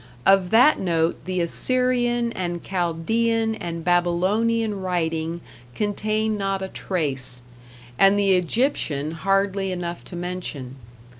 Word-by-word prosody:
Of 195 -2 +4
that 245 +9 +5
note 165 -2 0
the 185 -1 -1
Assyrian 240 +4 +1
and 175 -4 -4
Chaldean 220 +6 0
and 170 -5 -5
Babylonian 195 +5 +1
writing 165 -2 -2 0.3
contain 215 +1 -1
not 195 -1 -1
a 190 - -5
trace, 135 -11 -1 0.6
and 195 +1 +6
the 200 -1 +2
Egyptian 180 - 0
hardly 195 +2 0
enough 175 -1 -5
to 180 - -9
mention. 175 -7 -5
185 Hz, 115 wpm, -23 LUFS, 170-215 Hz, 0.6 s, and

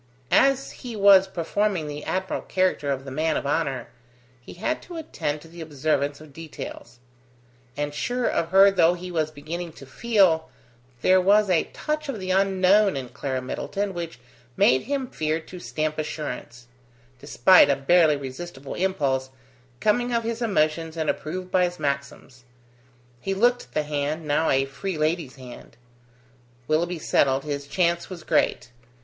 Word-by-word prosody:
As 275 0 +3
he 245 -3 -8
was 195 -2 +6
performing 190 0 -1
the 150 0 -6
admirable 190 0 -3
character 185 -6 0
of 135 -1 -2
the 135 - -7
man 155 +3 0
of - - -4
honour, 140 -4 -1 0.5
he - - -11
had 220 - -2
to 345 -1 -9
attend 150 - -4
to 165 - -14
the 170 +1 -11
observance 145 -2 -1
of 155 -2 -14
details; 145 -6 -9 0.8
and 145 0 -2
sure 245 +11 -2
of 165 - 0
her 195 +2 +7
though 175 -2 +4
he 180 +1 -8
was 160 -3 0
beginning 160 +3 -6
to 135 - -12
feel, 170 - +2 0.5
there 185 0 +5
was 200 +1 +4
a 170 - +3
touch 305 -1 -4
of 240 -6 -3
the 185 0 -3
unknown 195 -1 +3
in 130 -2 -5
Clara 130 0 -4
Middleton 195 +9 -3
which 170 -2 -6 0.4
made 130 +1 +4
him 275 -1 -1
fear 155 -8 -2
to 180 +3 -11
stamp 155 -2 -3
assurance; 150 -5 -5 0.5
despite 145 +4 +5
a 140 - +4
barely 155 +2 +4
resistible 135 +1 -7
impulse, 140 -8 0 0.5
coming 240 - +1
of 230 -1 +1
his 230 +1 -3
emotions 165 -6 0
and 160 -2 +1
approved 180 +4 -6
by 180 -1 +4
his 175 0 -4
maxims. 140 -3 -4 0.8
He 195 +9 -2
looked 245 +4 +2
at - - -28
the 155 - 0
hand, 150 +2 -3
now 150 +2 +1
a 135 0 +3
free 160 +6 -5
lady's 155 -2 -1
hand. 125 -3 -12 0.9
Willoughby 170 +3 0
settled, 135 -3 +2
his 145 -1 -4
chance 170 +1 0
was 180 -4 -8
great. - - 0
165 Hz, 160 wpm, -24 LUFS, 145-190 Hz, 0.9 s, her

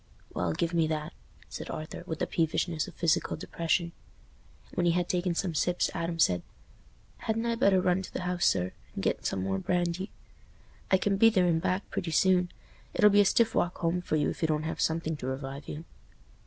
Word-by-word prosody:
"Well, 90 -2 0
give 170 - -1
me 165 -2 +3
that," 155 -1 -3 0.3
said - - -7
Arthur, 155 0 -6
with 160 - -3
the - - 0
peevishness 165 0 0
of - - -11
physical 170 0 +1
depression. 170 +1 -1 0.8
When 175 - +1
he 170 - +4
had 175 0 0
taken 180 -1 0
some 175 -1 -1
sips, 175 +3 +1
Adam 170 0 -2
said, 90 - +3 0.8
"Hadn't 225 +1 -2
I 235 - +1
better 200 -4 +4
run 180 +1 +2
to 190 - -9
th' - - -4
house, 180 -1 +1
sir, 90 -1 +1 0.2
and - - -4
get - - 0
some 95 - -2
more 95 0 -1
brandy? 175 - -1 0.8
I 190 - +5
can 195 +1 +1
be 225 +3 +7
there 190 -5 +3
and 165 -2 +2
back 185 +4 -1
pretty 170 - -2
soon. 180 +2 +3 0.5
It'll 210 0 +6
be 205 +1 +6
a - - +4
stiff 225 +3 +3
walk 175 - 0
home 170 +1 0
for 165 - -1
you, 150 -1 +1
if - - -9
you 160 - +3
don't 155 -1 0
have 160 - -3
something 160 0 0
to 130 - -5
revive 135 +1 -5
you." 155 +3 -6
170 Hz, 210 wpm, -29 LUFS, 155-185 Hz, 0.8 s, be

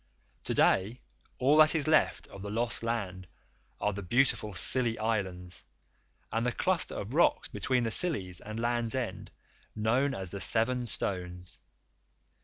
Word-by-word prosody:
To - - -2
day 105 +6 +3 0.4
all 140 +4 +4
that 155 +1 +6
is 155 -1 0
left 155 0 +3
of 100 - -10
the 100 - -5
lost 115 +3 -1
land 100 -6 -3 0.5
are 105 - 0
the 100 - -5
beautiful 110 +2 +1
Scilly 120 +2 +1
Islands 95 -5 -3 0.7
and 115 +1 0
the 125 - +1
cluster 185 +6 0
of 105 +5 -5
rocks 170 +3 +3
between 125 -2 0
the 115 - -1
Scillies 100 - 0
and 110 +1 -6
Land's 120 0 -1
End, 105 -6 -4 0.5
known 125 +6 +1
as 95 -2 -6
the 100 - -6
Seven 120 +5 +1
Stones. 90 -4 -4
115 Hz, 150 wpm, -30 LUFS, 95-125 Hz, 0.7 s, that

